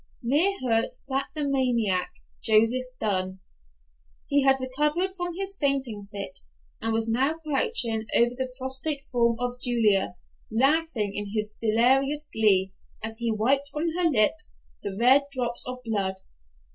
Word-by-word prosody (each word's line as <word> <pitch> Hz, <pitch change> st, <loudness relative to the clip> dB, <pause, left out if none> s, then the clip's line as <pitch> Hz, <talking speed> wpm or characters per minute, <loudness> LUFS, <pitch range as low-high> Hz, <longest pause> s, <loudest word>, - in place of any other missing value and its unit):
Near 320 Hz, +11 st, +3 dB
her 230 Hz, -3 st, +2 dB
sat 270 Hz, +1 st, -3 dB
the 300 Hz, -, -2 dB
maniac, 235 Hz, -9 st, 0 dB, 0.3 s
Joseph 225 Hz, +4 st, +2 dB
Dunn. 185 Hz, -3 st, -1 dB, 0.9 s
He 285 Hz, 0 st, +2 dB
had 270 Hz, 0 st, +3 dB
recovered 300 Hz, +8 st, 0 dB
from 355 Hz, -2 st, -5 dB
his 390 Hz, +1 st, 0 dB
fainting 265 Hz, -, -2 dB
fit, 200 Hz, -1 st, -6 dB, 0.4 s
and 225 Hz, -, 0 dB
was 225 Hz, 0 st, 0 dB
now 265 Hz, +7 st, +1 dB
crouching 285 Hz, -, 0 dB
over 240 Hz, +1 st, +4 dB
the 260 Hz, 0 st, -4 dB
prostrate 265 Hz, +2 st, -1 dB
form 235 Hz, -2 st, +2 dB
of 245 Hz, 0 st, -4 dB
Julia, 215 Hz, -7 st, +2 dB, 0.4 s
laughing 265 Hz, -3 st, +1 dB
in 205 Hz, 0 st, -4 dB, 0.3 s
delirious 265 Hz, +7 st, +2 dB
glee, 195 Hz, -3 st, +2 dB, 0.3 s
as 220 Hz, +1 st, 0 dB
he 235 Hz, -1 st, -1 dB
wiped 270 Hz, +6 st, +1 dB
from 305 Hz, +3 st, -2 dB
her 345 Hz, 0 st, +2 dB
lips 290 Hz, +4 st, +1 dB, 0.3 s
the 195 Hz, -1 st, -5 dB
red 265 Hz, +4 st, +6 dB
drops 240 Hz, -3 st, -2 dB
of 250 Hz, 0 st, -6 dB
blood! 200 Hz, -5 st, -1 dB
250 Hz, 140 wpm, -26 LUFS, 220-285 Hz, 0.9 s, red